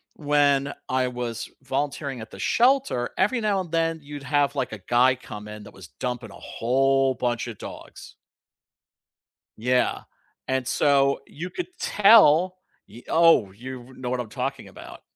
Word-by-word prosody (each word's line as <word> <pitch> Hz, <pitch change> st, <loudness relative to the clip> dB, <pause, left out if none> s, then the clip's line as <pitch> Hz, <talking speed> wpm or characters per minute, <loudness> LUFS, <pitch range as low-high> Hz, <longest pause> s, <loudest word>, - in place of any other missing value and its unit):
when 145 Hz, -2 st, +2 dB, 0.2 s
I 130 Hz, 0 st, +1 dB
was 120 Hz, -2 st, -5 dB
volunteering 135 Hz, 0 st, -3 dB
at 110 Hz, 0 st, -9 dB
the -, -, -12 dB
shelter, 245 Hz, -, +2 dB
every 220 Hz, +6 st, +2 dB
now 205 Hz, -3 st, +1 dB
and 175 Hz, -3 st, -9 dB
then 165 Hz, 0 st, 0 dB
you'd 145 Hz, -1 st, -9 dB
have 140 Hz, 0 st, +1 dB
like 135 Hz, -, -2 dB
a 105 Hz, -, -7 dB
guy 125 Hz, +6 st, +3 dB
come 105 Hz, -4 st, -10 dB
in 105 Hz, 0 st, -9 dB
that 105 Hz, -, -13 dB
was 95 Hz, -4 st, -12 dB
dumping 115 Hz, -, -5 dB
a -, -, -13 dB
whole 135 Hz, +2 st, +1 dB
buncha 120 Hz, -2 st, -2 dB
dogs. -, -, -11 dB, 1.4 s
Yeah, 125 Hz, +3 st, +1 dB, 0.5 s
and 130 Hz, -1 st, -1 dB
so 140 Hz, -1 st, +2 dB
you 175 Hz, +5 st, -7 dB
could 360 Hz, -, -5 dB
tell, 185 Hz, -4 st, +5 dB, 0.3 s
y 120 Hz, -, -14 dB
oh, 165 Hz, -, +4 dB
you 125 Hz, +4 st, -10 dB
know 125 Hz, -1 st, -5 dB
what 125 Hz, -, -1 dB
I'm 120 Hz, -3 st, -5 dB
talking -, -, -4 dB
about. -, -, -12 dB
130 Hz, 155 wpm, -24 LUFS, 120-150 Hz, 1.4 s, tell